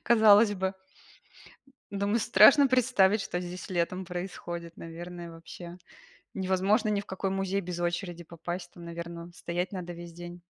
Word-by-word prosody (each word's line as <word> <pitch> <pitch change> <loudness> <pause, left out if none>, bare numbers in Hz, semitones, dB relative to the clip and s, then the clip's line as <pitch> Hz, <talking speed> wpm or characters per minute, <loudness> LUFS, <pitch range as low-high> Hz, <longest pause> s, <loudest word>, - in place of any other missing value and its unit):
Казалось 220 -2 +6
бы. 190 0 -1 1.2
Думаю, 200 +3 +1
страшно 225 +8 +7
представить, 230 -5 +4
что 180 -3 -3
здесь 180 +1 -7
летом 185 +1 -1
происходит, 175 -2 -6
наверное, 170 +1 -8
вообще. 170 +1 -10 0.6
Невозможно 190 +4 +2
ни 205 -1 +1
в 200 - -7
какой 190 0 -3
музей 195 +1 -1
без 175 -1 -5
очереди 175 0 -2
попасть. 175 +2 -6
Там, 175 - -12
наверно, 170 0 -7
стоять 175 +1 -3
надо 180 -3 -5
весь 170 0 -9
день. 175 +1 -9
180 Hz, 140 wpm, -29 LUFS, 175-200 Hz, 1.2 s, страшно